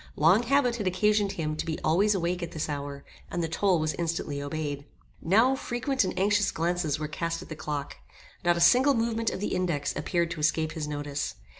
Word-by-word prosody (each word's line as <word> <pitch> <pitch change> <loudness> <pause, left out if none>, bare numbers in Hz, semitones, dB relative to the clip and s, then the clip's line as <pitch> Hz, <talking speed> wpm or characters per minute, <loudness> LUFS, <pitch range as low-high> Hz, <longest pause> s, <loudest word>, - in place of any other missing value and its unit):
Long 165 +8 +5
habit 250 -1 +2
had 210 -4 -2
occasioned 205 +2 +2
him 155 -2 -2
to - - -2
be 160 -1 -3
always 200 +7 +3
awake 180 0 -1
at 170 - -5
this 155 - -2
hour, 140 -1 -5 0.2
and 175 - -2
the - - 0
toll 180 +3 +2
was 155 0 0
instantly 165 -4 -2
obeyed. 145 -1 -4 0.4
Now 225 +10 +4
frequent 265 0 -1
and 185 -1 -3
anxious 205 +1 +3
glances 165 -2 -1
were 155 0 -3
cast 165 +2 -3
at - - -15
the 155 - -5
clock. 145 -2 -4 0.5
Not 175 -1 +3
a - - -1
single 255 +11 +6
movement 230 0 0
of - - -5
the 210 - -2
index 160 -6 -1
appeared 170 -2 -1
to 170 - -5
escape 155 +1 +1
his 155 -2 -4
notice. 145 -1 -3
170 Hz, 205 wpm, -28 LUFS, 155-205 Hz, 0.5 s, single